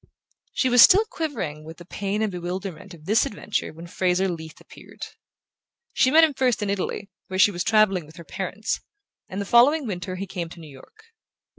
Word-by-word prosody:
She 260 - +1
was 245 -1 +6
still 405 - +7
quivering 180 - -4
with 160 +1 -11
the 175 - -13
pain 200 +4 -3
and 215 - -1
bewilderment 180 +1 -6
of 155 -2 -18
this 215 +5 +3
adventure 210 0 -4
when 165 +2 -11
Fraser 180 +2 0
Leath 160 -3 -7
appeared. - - -12 0.9
She 255 - +3
met 320 +4 +6
him 315 -2 +3
first 250 -5 0
in 200 - -1
Italy, 200 +1 -4 0.2
where 185 - -4
she 205 - +5
was 175 -2 -3
travelling 195 -7 +2
with 155 - -16
her 170 - -10
parents; 195 +5 -4 0.5
and 190 - -5
the 200 - -3
following 265 +8 +4
winter 185 -3 -5
he 195 +2 -5
came 175 -3 -5
to 170 - -12
New 155 -3 -12
York. 430 - -17
190 Hz, 195 wpm, -24 LUFS, 175-220 Hz, 0.9 s, still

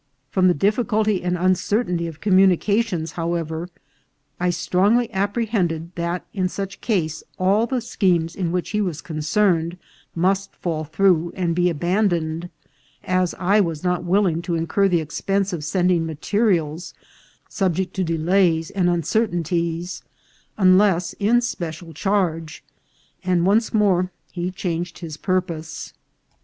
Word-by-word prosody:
From 185 -1 +3
the 180 - +4
difficulty 215 - +1
and 180 0 -1
uncertainty 180 0 +1
of 160 -2 -9
communications, 195 -1 +2
however, 165 0 -3 0.7
I 180 0 +1
strongly 200 +7 +2
api 205 +4 0
prehended 170 -7 -1
that 170 +1 -3
in 185 -2 0
such 195 +1 -6
case 165 -9 -1 0.2
all 200 +5 +2
the 255 0 -1
schemes 175 -7 0
in 175 -4 -2
which 180 0 -2
he 210 0 0
was 175 -7 -2
concerned 165 +2 0 0.4
must 190 +3 0
fall 160 -3 -3
through 170 +1 +2
and 175 -3 0
be 180 +1 +2
abandoned, 175 -1 0 0.5
as 185 -1 0
I 195 +4 +3
was 165 -4 -2
not 180 -1 0
willing 175 -2 +2
to 170 -1 -2
incur 165 +5 +1
the 175 -3 +2
expense 195 +5 -1
of 160 -4 -4
sending 175 0 +1
materials, 165 -1 -1 0.5
subject 190 -2 -1
to 190 - +1
delays 165 0 +1
and 185 -3 +1
uncertainties, 175 -1 -1 0.6
unless 185 -2 +4
in 225 +4 +3
special 170 -7 -5
charge, 165 -3 -1 0.6
and 180 -2 +2
once 215 +4 +3
more 185 -4 +2 0.2
he 175 0 -3
changed 175 -2 -4
his 160 -4 -7
purpose. 170 -3 -3
180 Hz, 130 wpm, -22 LUFS, 165-195 Hz, 0.7 s, the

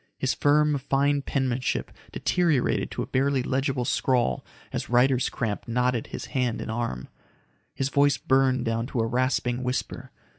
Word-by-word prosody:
His - - 0
firm, 150 0 +3
fine 140 +2 +1
penmanship 130 -3 -1 0.2
deteriorated 165 -8 +1
to - - -3
a - - -5
barely 135 0 +1
legible 130 -1 -1
scrawl 125 0 +1 0.3
as - - -3
writer's 125 +1 +3
cramp 110 -4 -3
knotted 125 0 0
his - - -6
hand 125 -4 0
and 110 - -4
arm. 110 - -3 0.7
His 135 0 -1
voice 145 0 +3
burned 130 -1 +2
down 115 +1 -1
to 130 - -3
a - - +1
rasping 125 0 0
whisper. 125 0 -3
130 Hz, 150 wpm, -26 LUFS, 120-140 Hz, 0.7 s, firm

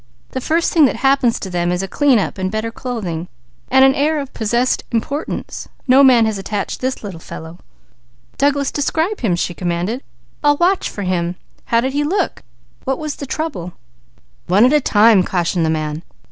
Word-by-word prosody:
"The 260 - -3
first 330 +5 +1
thing 320 -4 +6
that 260 - +1
happens 270 -3 +2
to - - -5
them 175 0 0
is 180 +1 -1
a - - -3
clean 275 +4 +3
up 200 - -2
and 185 0 -1
better 215 +2 -3
clothing; 195 -10 -4 0.4
then 265 +1 +5
an 270 0 +6
air 300 +3 +1
of 275 -2 -6
possessed 235 +3 0
importance. 280 +6 -3 0.2
No 265 +2 +6
man 245 -4 +6
has 215 -2 -1
attached 200 +1 -4
this 260 0 0
one." 190 -5 -7 1.2
"Douglas, 280 0 +2
describe 320 +7 -1
him," 200 -8 +1
she 175 +1 -2
commanded. 175 +8 -2 0.4
"I'll 290 0 +4
watch 360 +3 +2
for 205 - -6
him. 180 -1 -1 0.3
How 230 0 +2
did 265 +2 -2
he 290 +1 +1
look? 365 +4 -1 0.4
What 265 0 -1
was 305 -2 -5
the 280 - -6
trouble?" 220 - -4 0.7
"One 200 +6 +5
at 255 - +4
a 300 - +4
time," 215 -3 +5
cautioned 175 -2 0
the - - 0
man. 155 0 -2
235 Hz, 185 wpm, -18 LUFS, 185-280 Hz, 1.2 s, thing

